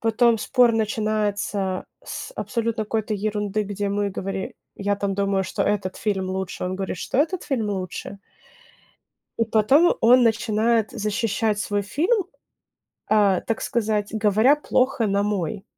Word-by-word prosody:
потом 230 +1 +3
спор 245 +1 +3
начинается 210 -3 -1 0.2
с - - -6
абсолютно 230 -2 -2
какой-то 215 0 -2
ерунды, 210 0 -1
где 205 0 -3
мы 200 0 0
говори 190 0 -4 0.2
я 205 0 0
там 200 -1 -2
думаю, 195 -1 +1
что - - -2
этот 200 -3 -1
фильм 195 -3 -1
лучше. 190 -1 -4
Он 185 +1 -3
говорит, 190 -1 -3
что 255 - -3
этот 330 +5 +1
фильм 230 -6 -1
лучше. 195 0 -5 1.2
И 230 - +3
потом 225 +10 +4
он 245 +3 +6
начинает 225 0 +2
защищать 215 -1 -1
свой 205 -1 -1
фильм, 345 - +1 0.8
а, 205 -4 +3
так 225 - -2
сказать, 215 -4 -1
говоря 220 +6 +4
плохо 255 -5 +1
на 200 0 +1
мой. 200 -2 -2
210 Hz, 140 wpm, -23 LUFS, 200-230 Hz, 1.2 s, он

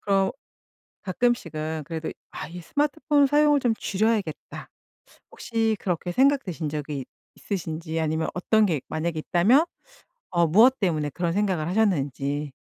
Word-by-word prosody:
그럼 195 -1 +2 0.7
가끔씩은 165 -8 -1
그래도 160 0 -4 0.2
'아 - - -6
이 175 +2 -9
스마트폰 290 - +1
사용을 295 +1 +4
좀 245 -4 +1
줄여야겠다.' 205 -5 -2 0.6
혹시 225 -2 -1
그렇게 175 -1 -2
생각되신 255 - +1
적이 145 -2 -4 0.3
있으신지 165 -3 -4
아니면 160 0 -1
어떤 215 +4 +3
게 160 -7 0
만약에 160 +1 -2
있다면 195 - +4 0.7
어 170 -1 +3
무엇 230 +10 +5
때문에 155 -7 0
그런 170 +2 -2
생각을 190 -5 0
하셨는지. 145 - 0
180 Hz, 315 characters per minute, -25 LUFS, 160-225 Hz, 0.7 s, 무엇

